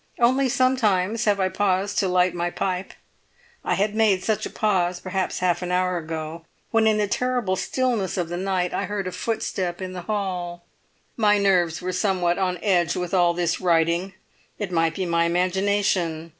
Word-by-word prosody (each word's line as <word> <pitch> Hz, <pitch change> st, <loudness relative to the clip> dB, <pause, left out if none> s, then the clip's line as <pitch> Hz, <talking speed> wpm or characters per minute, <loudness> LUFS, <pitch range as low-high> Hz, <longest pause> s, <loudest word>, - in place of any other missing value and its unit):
Only 260 Hz, +3 st, +3 dB
sometimes 230 Hz, -4 st, +1 dB
have 205 Hz, -2 st, +2 dB
I 190 Hz, -1 st, +2 dB
paused 195 Hz, 0 st, 0 dB
to 195 Hz, -, +1 dB
light 180 Hz, -1 st, +2 dB
my 175 Hz, 0 st, -1 dB
pipe. 185 Hz, +1 st, -3 dB, 0.7 s
I -, -, 0 dB
had 205 Hz, +2 st, 0 dB
made 215 Hz, -4 st, +2 dB
such 220 Hz, -2 st, 0 dB
a -, -, -10 dB
pause, 180 Hz, -4 st, 0 dB
perhaps 185 Hz, 0 st, -2 dB
half 180 Hz, -1 st, +1 dB
an 180 Hz, 0 st, -3 dB
hour 180 Hz, 0 st, +1 dB
ago, 160 Hz, 0 st, -6 dB, 0.3 s
when 225 Hz, -1 st, +3 dB
in 215 Hz, -1 st, +3 dB
the 210 Hz, -1 st, +1 dB
terrible 245 Hz, -3 st, 0 dB
stillness 235 Hz, -4 st, -1 dB
of 175 Hz, -2 st, -1 dB
the 175 Hz, -, -4 dB
night 185 Hz, -1 st, -1 dB
I 200 Hz, -, -1 dB
heard 205 Hz, -1 st, -3 dB
a 185 Hz, -, -3 dB
footstep 185 Hz, -5 st, -3 dB
in 185 Hz, -1 st, -5 dB
the 180 Hz, -, -6 dB
hall. 180 Hz, -4 st, -3 dB, 0.5 s
My 210 Hz, -2 st, +4 dB
nerves 180 Hz, -4 st, +2 dB
were 185 Hz, 0 st, -2 dB
somewhat 185 Hz, -2 st, +1 dB
on 185 Hz, -1 st, 0 dB
edge 175 Hz, -4 st, +2 dB
with 180 Hz, 0 st, -4 dB
all 175 Hz, -2 st, +3 dB
this 175 Hz, 0 st, -1 dB
writing; 170 Hz, +2 st, +1 dB, 0.4 s
it 205 Hz, -3 st, -4 dB
might 165 Hz, -1 st, +1 dB
be 190 Hz, -, -2 dB
my 170 Hz, -1 st, +2 dB
imagination. 180 Hz, -2 st, 0 dB
185 Hz, 185 wpm, -24 LUFS, 175-205 Hz, 0.7 s, My